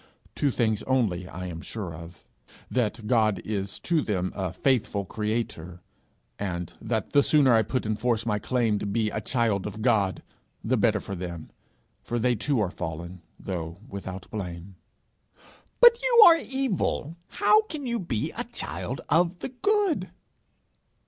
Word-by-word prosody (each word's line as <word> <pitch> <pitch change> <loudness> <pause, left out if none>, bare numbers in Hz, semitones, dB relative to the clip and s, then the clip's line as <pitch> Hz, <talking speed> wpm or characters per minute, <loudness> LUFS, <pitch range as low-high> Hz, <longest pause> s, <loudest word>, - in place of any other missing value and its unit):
Two 145 - +1
things 110 -5 0
only 105 -9 +1
I 90 0 -7
am 85 -2 -6
sure 95 -5 -5
of: 85 +2 -11 0.5
that 115 -2 -1
God 110 -3 +3
is 100 -2 -3
to 170 -3 +1
them 95 -7 -2
"a 95 -4 -2
faithful 105 -1 0
creator;" 100 -5 -3 0.6
and 90 -4 -4
that 110 -1 -2
the 145 - +6
sooner 140 -3 +4
I 110 - +5
put 130 +2 -2
in 110 0 0
force 115 0 0
my 105 -2 0
claim 115 -3 +1
to - - -3
be 110 +1 0
a 110 - -3
child 110 -5 0
of 105 +1 -6
God, 105 -6 +2 0.4
the 130 - +1
better 110 -2 +2
for 100 - -7
them; 85 -3 -6 0.5
for 120 - -3
they 125 +1 +2
too 125 +4 0
are 95 -4 0
fallen, 85 +1 -6 0.2
though 85 -3 -5
without 95 -1 -7
blame.' 90 -2 -6 1.1
'But 480 0 +8
you 480 -2 +7
are 335 -1 +9
evil: 245 - -1
how 430 - +4
can 310 -10 -7
you 235 -1 -1
be 125 - -2
a - - -5
child - - -5
of 175 +2 +2
the - - -5
Good?' 405 - +1
110 Hz, 160 wpm, -26 LUFS, 95-130 Hz, 1.1 s, are